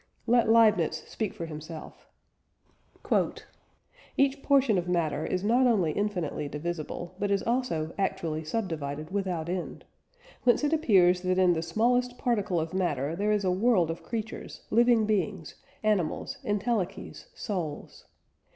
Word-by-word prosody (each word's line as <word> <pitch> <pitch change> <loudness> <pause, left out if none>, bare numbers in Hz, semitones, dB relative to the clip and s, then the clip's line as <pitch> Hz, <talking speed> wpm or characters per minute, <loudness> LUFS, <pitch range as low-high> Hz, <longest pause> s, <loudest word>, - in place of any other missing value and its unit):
Let 235 -1 +3
Leibniz 215 -7 +4
speak 215 -3 -3
for 170 - -6
himself: 155 0 -9 2.1
"Each 275 0 +2
portion 270 -9 +3
of 175 - -5
matter 160 -4 0
is 185 0 -1
not 245 +5 +4
only 195 -10 +2
infinitely 180 -7 -2
divisible, 170 +3 -5
but 205 - 0
is 200 -1 +1
also 230 -11 -1
actually 160 -5 -1
subdivided 155 -5 -4
without 185 -5 -2
end.... 180 0 -4 0.6
Whence 245 +3 +3
it 295 +2 +2
appears 185 - +4
that 185 0 0
in 185 -1 +5
the 160 - -1
smallest 245 +8 +1
particle 205 -7 0
of 160 +1 -3
matter 160 -5 -1
there 205 +3 0
is 210 -1 +1
a 185 - +2
world 185 -4 +3
of 165 - -7
creatures, 225 -2 -6
living 235 -1 +4
beings, 190 -7 -1 0.3
animals, 205 -7 0
entelechies, 205 - -2
souls. 175 - -5
190 Hz, 135 wpm, -28 LUFS, 165-225 Hz, 2.1 s, in